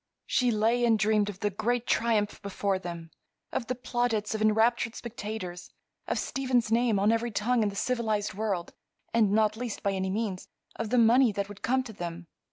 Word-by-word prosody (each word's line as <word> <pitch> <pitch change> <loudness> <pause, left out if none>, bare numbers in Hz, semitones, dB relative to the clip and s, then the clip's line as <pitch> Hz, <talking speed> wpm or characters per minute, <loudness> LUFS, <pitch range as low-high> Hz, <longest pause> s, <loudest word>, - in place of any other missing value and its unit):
She 250 -1 +2
lay 230 +2 +2
and 230 -2 +4
dreamed 210 -1 +2
of 195 -2 -8
the 205 - +1
great 240 +5 -1
triumph 220 -4 +1
before 200 -1 -1
them; 170 -2 -7 0.4
of 235 - -3
the 255 - -1
plaudits 240 -4 -1
of 220 - -3
enraptured 225 +2 +2
spectators; 210 -6 -6 0.4
of - - 0
Stephen's 250 -4 0
name 230 -2 +3
on 205 +3 +3
every 230 +1 0
tongue 230 +3 +1
in 210 - +2
the 200 - -8
civilized 220 -3 -1
world; 195 -4 -2 0.4
and, 220 -4 +3
not 215 0 +3
least 240 -3 -5
by 200 - +2
any 190 -1 -1
means, 200 -2 -3 0.3
of 225 -2 -4
the 250 - +2
money 235 +1 +5
that 200 0 -3
would 205 - -11
come 260 +2 +1
to 230 -4 -9
them. 175 -2 -6
220 Hz, 190 wpm, -28 LUFS, 200-235 Hz, 0.4 s, money